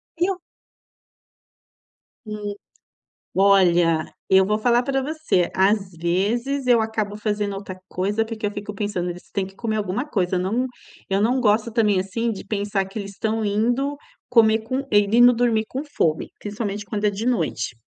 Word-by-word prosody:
E 345 +2 +1
eu 375 -1 -2 1.9
Hum. 210 -1 -5 0.8
Olha, 175 -5 +4 0.2
eu 190 0 +6
vou 210 +2 +1
falar 240 +2 +3
para 270 0 -1
você, 305 - 0
às 195 0 +2
vezes, 215 +11 -1
eu 240 -2 +5
acabo 215 -2 -2
fazendo 210 -1 -2
outra 195 -1 -7
coisa 205 +4 0
porque 225 -1 -7
eu - - -1
fico 205 0 -6
pensando: 195 -4 -2
"Eles 175 +1 -10
têm 195 -2 -1
que 195 - -14
comer 220 0 -2
alguma 210 +5 -1
coisa." 185 -10 0
Não, 215 +8 0 0.4
eu 195 +1 +1
não 250 +4 +2
gosto 215 0 +2
também, 210 -4 +3
assim, 230 +5 -2
de 200 - -7
pensar 200 -1 -1
que 195 +3 -7
eles 200 -1 -6
estão 220 +2 -1
indo 245 +8 0 0.3
comer 220 -2 +5
com 255 +5 -3
indo 225 +4 +6
dormir 230 -2 +1
com 270 +3 -4
fome, 165 - -1
principalmente, 205 -1 -4
quando 210 +1 -4
é 210 - +4
de 205 +3 -5
noite. 160 - -1
210 Hz, 165 wpm, -23 LUFS, 195-235 Hz, 1.9 s, eu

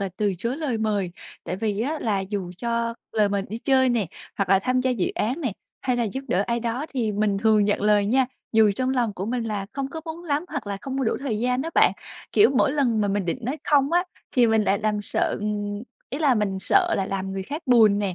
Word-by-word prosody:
là 195 - -1
từ 205 -2 +1
chối 235 +7 -2
lời 285 -8 -2
mời, 205 -4 0 0.3
tại 180 - -3
vì 210 -1 -1
á 295 +6 -1
là 205 -4 0
dù 190 -2 -4
cho 235 0 -1 0.2
lời 215 -2 +3
mời 200 0 0
đi 220 - -5
chơi 260 +1 +3
nè, 235 -5 +1 0.3
hoặc 195 - 0
là 195 0 +5
tham 255 +5 +1
gia 255 0 +1
dự 225 -8 0
án 250 +9 -1
này, 260 -9 -1 0.3
hay 250 -2 0
là 240 - +1
giúp 240 +5 -3
đỡ 185 - +2
ai 235 0 0
đó 240 +5 -2
thì 230 -5 0
mình 205 -1 +1
thường 215 0 +4
nhận 205 0 +1
lời 210 -1 +4
nha. 255 +4 +3 0.3
Dù 220 -2 +5
trong 255 0 0
lòng 245 -5 +1
của 190 +1 -4
mình 240 +1 -1
là 205 -3 -3
không 275 0 -3
có 320 - -6
muốn 330 +1 -7
lắm 300 +1 0
hoặc 290 -9 -5
là 200 -1 -3
không 270 +2 -4
có 270 - 0
đủ 225 - +1
thời 250 -6 -2
gian 250 +3 0
á 325 - -4
bạn, - - +5 0.4
kiểu, 415 - +6
mỗi 265 - +3
lần 250 -7 +1
mà 205 - +1
mình 200 0 0
định 175 - -2
nói 260 +7 -3
không 285 0 +3
á 350 +1 +3 0.3
thì 245 -4 +5
mình 220 -1 +3
lại 200 0 +2
làm 210 0 -1
sợ, - - 0
ừm 205 0 -3 0.3
ý 275 - -3
là 290 -5 +4
mình 205 -3 0
sợ - - +3
là 195 - 0
làm 195 -1 -3
người 195 0 -3
khác 295 - -6
buồn 220 -5 +5
nè, 200 -3 -1
225 Hz, 260 wpm, -24 LUFS, 205-260 Hz, 0.4 s, kiểu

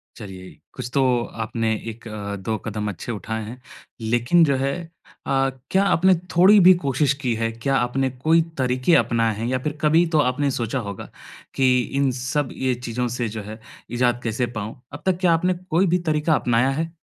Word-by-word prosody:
चलिए, 95 -4 -10 0.2
कुछ - - -6
तो 140 - +3 0.4
आपने 110 0 -1 0.2
1-2 110 -2 -5
कदम 105 -1 -3
अच्छे 105 +4 -6
उठाए 110 +1 -4
हैं। 120 +4 -9 0.4
लेकिन 120 +9 +3
जो 140 -3 +3
है 135 +1 0 0.6
अ, 135 0 +2 0.2
क्या 190 +1 +3
आपने 190 -1 +4 0.2
थोड़ी 195 +4 +7
भी 185 0 +8
कोशिश 140 +1 +2
की 125 -3 0
है? 115 0 -1
क्या 115 +4 -1
आपने 130 +2 0
कोई 155 +6 +2 0.2
तरीके 130 +4 +2
अपनाए 115 -2 +2
हैं? 110 - -4
या 130 - 0
फिर 150 +3 -3
कभी 160 +3 +4
तो - - +5
आपने 140 +1 +1
सोचा 120 +1 -2
होगा 100 - -7 0.5
कि 130 -1 +3 0.2
इन 140 -1 +2
सब 130 +3 -2
ये 130 -1 -1
चीज़ों 125 0 -3
से 120 0 -2
जो 110 0 -6
है 110 +2 -9 0.3
इज़ाद 120 0 +1
कैसे 115 +2 -1
पाऊँ? 110 +4 -6
अब 145 - -9
तक 185 -2 +2
क्या 175 -3 +4
आपने 180 +3 +1 0.2
कोई 180 +3 +3
भी 180 +2 +2
तरीका 155 +1 +1
अपनाया 120 +2 +2
है? 160 +4 -2
125 Hz, 185 wpm, -22 LUFS, 115-150 Hz, 0.6 s, भी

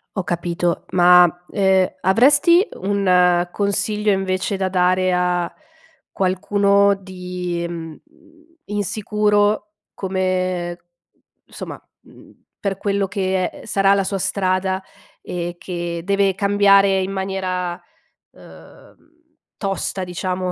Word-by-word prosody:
Ho 190 - -1
capito. 175 0 -2
Ma, 175 -1 +5
ehm, 190 -2 +2
avresti 290 - +4
un 180 -3 +2
consiglio 210 +1 0
invece 190 +1 -1
da 190 -1 -1
dare 185 0 +2
a 180 -1 0 0.6
qualcuno 200 +2 +2
di, 180 -2 -5
mhmm, 165 -2 -7 0.7
insicuro 210 0 0 0.3
come 185 -2 -2 0.7
somma, - - -9 0.2
mhmm, - - -18 0.3
per 195 -2 -2
quello 200 -1 -1
che, 190 -1 -1
ehm, - - -8
sarà 195 0 +2
la 195 - +1
sua 195 0 -3
strada 190 0 -1 0.4
e 175 0 -5
che 170 -2 -5
deve 195 0 +1
cambiare 200 -1 +4
in 190 +1 -3
maniera, 185 -2 -3 0.5
uhm, - - -17 0.6
tosta 195 -1 -3
diciamo 180 +1 -3
190 Hz, 100 wpm, -20 LUFS, 180-200 Hz, 0.7 s, Ma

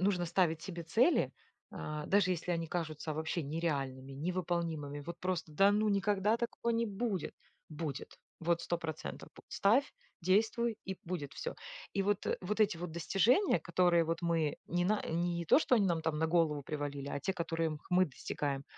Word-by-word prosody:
нужно 185 -2 +2
ставить 165 -2 +1
себе 170 -3 -6
цели, 245 - +3 0.4
э, 150 0 -4
даже 195 -2 +3
если 175 0 -1
они 165 -1 -1
кажутся 155 -3 -3
вообще 160 +2 -2
нереальными, 140 -4 -2
невыполнимыми. 165 -2 -2
Вот 170 +4 -7
просто: 180 -3 -2
"Да 195 +6 +5
ну 215 +1 +2
никогда 205 +2 +2
такого 235 0 -2
не 230 0 +1
будет!" 205 -3 -2 0.3
Будет. 155 -3 -5 0.2
Вот 170 0 +1
100% 165 -2 -4
будет. - - -15
Ставь, 235 +8 +3 0.3
действуй 220 +5 +2
и 190 - -2
будет 165 -5 -4
всё. 485 - -4 0.4
И 195 - +3
вот, 205 0 0
э, - - +1
вот 210 +4 -2
эти 210 -4 +4
вот 175 -1 -4
достижения, 210 - +3
которые 170 -1 +3
вот 165 +1 -2
мы 165 -3 +1
ни 175 +1 0
на 210 +2 +2
не 170 +1 0
то, 170 - +6
что 260 - +3
они 205 -4 +4
нам 165 -2 +1
там 155 -1 -1
на 160 - +2
голову 160 -4 +2
привалили, 145 -1 -4
а - - -2
те, 190 +7 -1
которые 165 -2 -1
х - - -30
мы 185 +1 +6
достигаем. 140 0 -3
170 Hz, 180 wpm, -33 LUFS, 160-195 Hz, 0.4 s, то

